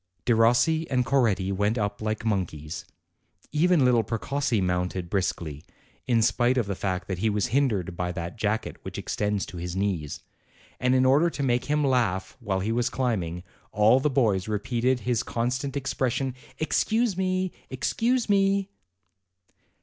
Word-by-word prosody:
Derossi 120 +8 +3
and 125 -2 +1
Coretti 110 -9 +2
went 105 +4 0
up 105 -1 -2
like 110 +1 -2
monkeys; 85 -8 -2 0.7
even 160 -1 +3
little 120 -2 +4
Precossi 120 +2 -1
mounted 90 -1 -1
briskly, 85 -6 -2 0.4
in 115 -3 +3
spite 120 +2 +2
of 120 - +2
the 100 - -2
fact 95 -1 -3
that 95 -2 -3
he 110 +3 +2
was 105 -2 0
hindered 105 -11 +1
by 90 0 -2
that 85 -1 -5
jacket 110 0 -2
which - - -7
extends 105 -1 -1
to 90 - -9
his 85 +1 -4
knees; 95 -7 -2 0.6
and 125 0 +2
in 130 0 +4
order 145 +6 +4
to 145 - -4
make 125 -1 +1
him 150 +2 +1
laugh 120 -8 0
while 100 -6 -1
he 105 +4 -1
was 120 +1 +1
climbing, 100 -9 -2 0.3
all 110 +5 +5
the 150 - +1
boys 110 -9 +1
repeated 120 +4 0
his 120 -2 0
con 120 0 -1
stant 135 +1 -3
expression, 135 -1 -1 0.2
"Excuse 220 +6 +1
me! 185 0 0 0.2
excuse 230 - 0
me!" 195 -1 +2
115 Hz, 155 wpm, -26 LUFS, 95-135 Hz, 0.7 s, all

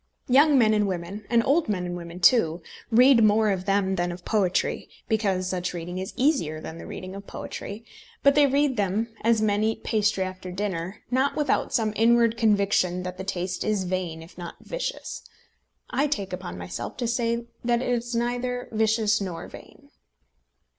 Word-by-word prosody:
Young 280 +3 +5
men 220 -3 +5
and 210 -1 +2
women, 190 +3 -5
and 235 -1 +3
old 300 -1 +2
men 185 -4 -1
and 175 0 -4
women 170 0 -8
too, 170 -4 +4 0.3
read 245 +1 +6
more 215 0 +4
of 185 -1 -2
them 195 -1 +1
than 175 0 0
of 175 0 -9
poetry, 195 -5 0 0.2
because 195 -5 0
such 180 -1 -2
reading 175 +2 -5
is 190 - -5
easier 245 - +1
than 160 +1 -8
the - - -9
reading 185 0 -7
of 200 0 -9
poetry; 210 +3 -7 0.4
but 280 - +6
they 290 0 +5
read 275 -1 +1
them, 210 +3 -1
as 225 -1 +3
men 205 0 +2
eat 220 0 -1
pastry 210 -3 +1
after 185 -1 -6
dinner, 185 0 -4
not 265 +3 +2
without 295 -3 0
some 215 -2 +1
inward 230 0 +4
conviction 200 -5 +2
that 180 0 -6
the - - -3
taste 180 -1 -3
is 210 -3 0
vain 180 -3 -3
if 170 +2 -15
not 175 -1 -7
vicious. - - -5 0.7
I 275 +4 +1
take 200 -10 -3
upon 90 - -6
myself 90 0 -6
to 240 - -1
say 235 0 0 0.2
that 240 +1 +1
it - - -2
is 240 0 -1
neither 245 +1 -2
vicious 220 -1 +2
nor 180 -4 -5
vain. - - -14
210 Hz, 180 wpm, -25 LUFS, 185-235 Hz, 0.7 s, read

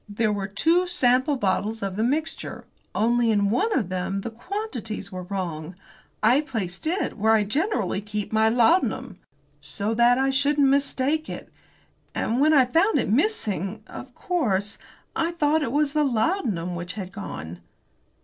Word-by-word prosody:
There 210 +1 0
were 200 -1 -3
two 330 - +2
sample 260 -4 +2
bottles 210 -1 -1
of 195 -1 -3
the 215 - -1
mixture, 300 +6 -2 0.3
only 235 +1 +2
in 205 -2 +2
one 415 - +1
of 210 -8 -1
them 185 +1 -2
the 230 - -5
quantities 240 - -5
were 185 -1 -5
wrong. 175 -3 -5 0.5
I 245 +6 +5
placed 220 - -5
it 345 - -1
where 220 +2 +4
I 215 -1 +4
generally 215 - 0
keep 210 0 -5
my 220 0 +4
laudanum 245 +11 +2 0.4
so 210 +1 -3
that 240 +2 +4
I 270 +1 +2
shouldn't 280 +1 +3
mistake 280 +2 +1
it. - - -8 0.6
And 240 +4 0
when 305 +2 +5
I 275 -4 +6
found 335 - +2
it - - 0
missing, 220 - 0
of 255 -1 -10
course 210 - -1 0.4
I 330 +1 0
thought 310 -1 +2
it 270 - -1
was 290 0 +1
the 305 -1 +2
laudanum 230 - 0
which 175 0 -5
had 190 -3 -6
gone." 85 - -7
230 Hz, 160 wpm, -25 LUFS, 200-290 Hz, 0.6 s, I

